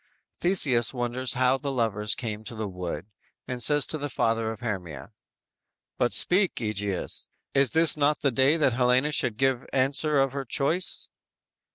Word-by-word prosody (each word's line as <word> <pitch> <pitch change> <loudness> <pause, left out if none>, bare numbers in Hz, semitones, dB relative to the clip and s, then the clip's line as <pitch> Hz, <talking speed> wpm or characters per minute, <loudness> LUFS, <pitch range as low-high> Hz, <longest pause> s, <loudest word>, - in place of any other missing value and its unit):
Theseus 140 -10 +2
wonders 125 +1 -1
how 130 +1 +1
the 140 0 -4
lovers 110 -4 0
came 110 -3 -6
to 115 - -6
the 110 -1 -4
wood, 90 -2 -6 0.4
and 125 -1 -5
says 145 +4 +4
to 155 - 0
the 145 +1 -4
father 115 -2 -1
of 110 - -10
Hermia: 90 - -6 0.9
_"But 120 - +1
speak, 185 +1 +3
Egeus; 105 -4 -2 0.3
is 155 +5 +4
not 150 0 +1
this - - -21
the 140 - +2
day 135 +5 +2
That 140 -6 +2
Helena 125 +4 +2
should 120 -6 +1
give 135 -1 +1
answer 140 +3 +1
of 135 -1 +1
her 140 +1 -4
choice?" 150 +8 -1
130 Hz, 165 wpm, -26 LUFS, 110-140 Hz, 0.9 s, says